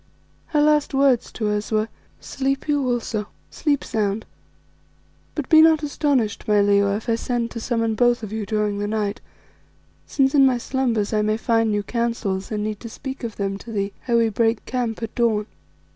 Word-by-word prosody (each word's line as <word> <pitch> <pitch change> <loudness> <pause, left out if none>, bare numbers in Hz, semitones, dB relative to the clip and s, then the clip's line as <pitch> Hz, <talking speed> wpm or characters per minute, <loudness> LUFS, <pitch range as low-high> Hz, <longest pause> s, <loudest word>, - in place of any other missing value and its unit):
Her 300 -2 +1
last 300 -2 +2
words 270 -3 +3
to 215 -2 -1
us 210 +1 -2
were 215 0 +1 0.3
"Sleep 270 +1 -2
you 285 -3 +1
also, 225 -3 -2 0.2
sleep 290 -3 0
sound, 215 -2 -1 1.1
but 300 -4 -3
be 315 -1 +7
not 315 -1 +5
astonished, 280 -7 0
my 210 -1 +4
Leo, 200 0 +3
if 215 - -6
I 230 - +2
send 235 0 -2
to 230 - -5
summon 230 -1 0
both 240 +1 +2
of 215 0 -6
you 220 -2 -3
during 210 -2 0
the 205 - -1
night, 210 -1 -2 0.9
since 270 -1 +2
in 280 -2 +6
my 260 -2 +4
slumbers 235 -4 -1
I 215 - +2
may 215 +1 +1
find 225 -1 +1
new 205 -1 0
counsels 230 -4 -2
and 210 -1 -2
need 215 -1 -3
to 230 - -8
speak 265 +4 -7
of 230 -2 -4
them 195 -1 -3
to 230 - -10
thee 200 -2 -2
ere 235 -1 +3
we 230 -1 +3
break 225 +1 0
camp 240 -3 -2
at 225 - -5
dawn." 220 -3 +1
225 Hz, 190 wpm, -22 LUFS, 210-255 Hz, 1.1 s, be